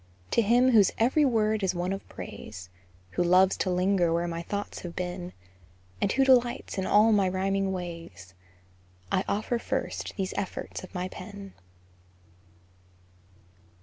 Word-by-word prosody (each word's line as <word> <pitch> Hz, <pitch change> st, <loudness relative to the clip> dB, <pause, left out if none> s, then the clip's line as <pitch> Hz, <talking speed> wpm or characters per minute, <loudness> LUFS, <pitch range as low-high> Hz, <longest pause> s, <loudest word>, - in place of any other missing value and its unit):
To -, -, +4 dB
him 245 Hz, +4 st, +4 dB
whose 210 Hz, -5 st, +5 dB
every 260 Hz, +7 st, +3 dB
word 220 Hz, -4 st, +2 dB
is 190 Hz, -1 st, 0 dB
one 180 Hz, +2 st, -1 dB
of 195 Hz, -, -8 dB
praise, 90 Hz, -3 st, -9 dB, 0.4 s
Who 175 Hz, -, 0 dB
loves 185 Hz, +2 st, +5 dB
to 185 Hz, -, -1 dB
linger 180 Hz, -1 st, +2 dB
where 170 Hz, +1 st, 0 dB
my 170 Hz, 0 st, -4 dB
thoughts 200 Hz, +4 st, -5 dB
have 175 Hz, -1 st, -8 dB
been, 180 Hz, 0 st, -4 dB, 0.7 s
And 200 Hz, -, +2 dB
who 270 Hz, 0 st, +3 dB
delights 245 Hz, -5 st, +2 dB
in 190 Hz, -, -1 dB
all 215 Hz, +2 st, +5 dB
my 200 Hz, -3 st, +3 dB
rhyming 195 Hz, +1 st, 0 dB
ways, 165 Hz, -, -7 dB, 0.8 s
I 185 Hz, -, +2 dB
offer 220 Hz, +3 st, -1 dB
first -, -, -3 dB
these 190 Hz, -2 st, -2 dB
efforts 195 Hz, -1 st, -4 dB
of 185 Hz, -, -12 dB
my 180 Hz, 0 st, -2 dB
pen. 195 Hz, +1 st, -9 dB
190 Hz, 150 wpm, -28 LUFS, 180-210 Hz, 0.8 s, whose